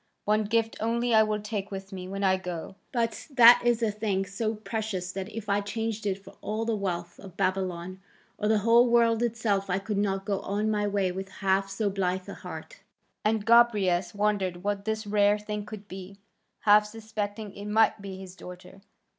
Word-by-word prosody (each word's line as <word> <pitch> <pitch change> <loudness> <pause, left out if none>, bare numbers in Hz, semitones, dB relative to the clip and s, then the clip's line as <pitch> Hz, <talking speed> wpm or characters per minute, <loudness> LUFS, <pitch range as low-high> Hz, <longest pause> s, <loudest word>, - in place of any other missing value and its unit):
One 215 +1 +2
gift 225 +1 +1
only 235 +2 0
I 220 - +7
will 215 -1 0
take 205 -2 -4
with 195 0 -7
me 185 -1 -6
when 195 +1 -4
I 190 -1 +4
go, 180 -1 -6 0.2
but 235 -3 -2
that 245 -4 +8
is 240 -1 +2
a 220 - +2
thing 205 -2 -1
so 215 +3 -2
precious 215 -4 -4
that 195 +1 -5
if 220 -1 -7
I 200 0 +2
changed 220 +1 -3
it 190 -1 0
for - - -14
all 215 +2 -2
the 230 -1 0
wealth 180 -4 -4
of 190 -2 -12
Babylon 185 -1 -2 0.4
or 210 - 0
the 220 0 +4
whole 235 +2 +6
world 230 -1 +4
itself 220 -4 0
I 180 - +1
could 200 +1 -2
not 195 -1 -1
go 200 -2 -1
on 210 +2 -1
my 210 -1 0
way 200 -2 0
with 190 +1 -6
half 195 0 0
so 205 +2 -1
blithe 185 -1 -1
a - - -6
heart." - - -9 0.4
And 215 -1 +1
Gobryas 205 -6 +4
wondered 200 -4 0
what 200 0 -2
this 220 0 -2
rare 205 0 +3
thing 210 0 -5
could 210 -1 -9
be, 190 +1 -9 0.4
half 210 0 +5
suspecting 215 -1 -5
it 200 - -8
might 220 0 +3
be 195 -1 -7
his 190 -1 -10
daughter. 180 +1 -11
205 Hz, 195 wpm, -28 LUFS, 195-220 Hz, 0.4 s, that